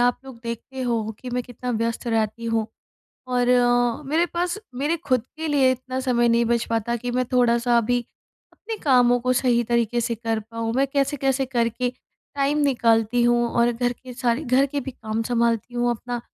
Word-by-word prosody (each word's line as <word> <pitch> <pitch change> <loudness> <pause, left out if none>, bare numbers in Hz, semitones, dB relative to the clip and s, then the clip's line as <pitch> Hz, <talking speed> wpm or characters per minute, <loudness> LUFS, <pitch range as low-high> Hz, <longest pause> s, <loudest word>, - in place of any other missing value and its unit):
आप 245 0 +3
लोग 265 -3 -11
देखते 235 +3 -6
हो 235 -2 0
हो 220 +1 -5
कि 250 - -7
मैं 250 0 -1
कितना 245 +1 -6
व्यस्त 230 +1 -2
रहती 225 0 -1
हूँ 225 -1 0 0.6
और 250 -1 +1
अ, 245 +1 +3
मेरे 315 +5 +1
पास 350 +3 -2 0.2
मेरे 295 +6 0
खुद 255 -3 +1
के 320 0 -3
लिए 275 -3 +4
इतना 255 +1 -4
समय 240 -2 +2
नहीं 235 0 +3
बच 235 0 +1
पाता 230 +1 0
कि 245 +1 -4
मैं 250 +1 0
थोड़ा-सा 240 -1 +3
अभी 245 +2 +1 0.5
अपने 450 +1 -7
कामों 245 -3 +5
को 255 +1 +1
सही 245 -2 +2
तरीके 235 0 +1
से 235 0 -1
कर 225 0 -2
पाऊँ। 225 +1 -4
मैं 275 +1 +3
कैसे-कैसे 275 -1 0
करके 240 0 0 0.4
टाइम 285 +1 +1
निकालती 235 -3 +2
हूँ 240 0 +3
और 235 +1 +2
घर 245 +1 0
के 250 +1 -12
सारे 245 +4 0
घर 265 +2 +3
के 285 +1 -3
भी 270 - -5
काम 220 -1 -4
सँभालती 235 0 0
हूँ 240 0 +1
अपना 240 +1 -4
245 Hz, 195 wpm, -23 LUFS, 235-260 Hz, 0.6 s, कामों